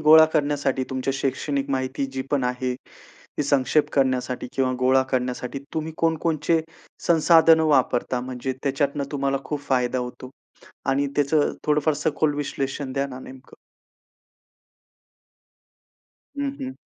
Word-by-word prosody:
गोळा 155 +1 +8
करण्यासाठी 145 -3 +1
तुमच्या 130 +1 -1
शैक्षणिक 140 +1 -2
माहिती 130 +1 -1
जी 130 - -3
पण 140 -3 +1
आहे. 125 0 -1
ती - - -22 0.4
संक्षेप 140 +1 +2
करण्यासाठी 130 -2 0
किंवा 130 -1 +1
गोळा 130 +1 +4
करण्यासाठी 125 +1 -2
तुम्ही 160 0 -3
कोणकोणचे 165 0 +1 0.5
संसाधन 165 -1 +6
वापरता? 130 -5 +2
म्हणजे 130 +1 -4
त्याच्यातनं 140 +1 0
तुम्हाला 140 -1 0
खूप 150 -2 -3
फायदा 125 -1 +1
होतो? 125 +1 -7 0.6
आणि 140 +1 +1
त्याचं 145 +1 +2
थोडंफार 150 +1 +2
सखोल 150 +1 0
विश्लेषण 135 -1 -3
द्या 140 0 0
ना 130 -2 -8
नेमकं. 130 0 -13 2.8
हं, 285 -1 0
हं. 260 -1 -4
140 Hz, 120 wpm, -24 LUFS, 130-150 Hz, 2.8 s, गोळा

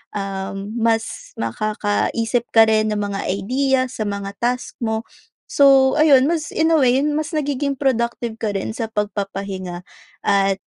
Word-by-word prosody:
um, 195 0 -4
mas 225 -1 -1
makakaisip 215 - -1
ka 225 - +9
rin 215 0 +2
ng - - -2
mga 195 - -3
idea 255 +8 +1
sa 215 -4 -3
mga 200 -1 -4
task 250 +1 -2
mo. 220 -1 -2 0.4
So, 270 -2 +5
ayun 285 -4 +6
mas 320 -1 -2
in 320 +1 +2
a 320 - +4
way, 260 0 +3
mas 305 +2 -1
nagiging 285 -1 -1
productive 235 -3 -1
ka 210 -3 -2
rin 195 - -2
sa 225 0 -4
pagpapahinga 195 -4 -4 0.4
at 195 -1 +2
225 Hz, 145 wpm, -20 LUFS, 200-265 Hz, 0.4 s, ka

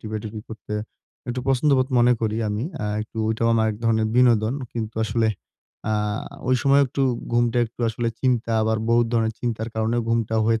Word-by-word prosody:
টিপা-টিপি 110 0 -5
করতে 110 -1 -7 0.5
একটু 125 +1 -2
পছন্দবোধ 135 0 +3
মনে 120 +1 +5
করি 110 -1 0
আমি। 105 +3 -2 0.2
আ - - -1 0.2
একটু 110 +1 -9
ওইটাও 110 +1 +1
আমার 110 -1 +3
এক 105 - -5
ধরনের 110 -1 +2
বিনোদন। 120 -1 +4 0.2
কিন্তু 110 -2 -4
আসলে 110 +1 +1 0.6
আ - - +2 0.6
ঐ - - +3
সময় 140 0 +5
একটু 135 +2 -2 0.3
ঘুমটা 120 0 +2
একটু 115 - -15
আসলে 115 +1 -1
চিন্তা 120 -3 +1
আবার 110 0 +1
বহুত 120 0 +4
ধরনের 110 -1 +1
চিন্তার 115 -2 -2
কারণে 110 +1 0
ঘুমটা 115 -1 0
হয়ে 115 0 +2
115 Hz, 175 wpm, -23 LUFS, 110-120 Hz, 0.6 s, মনে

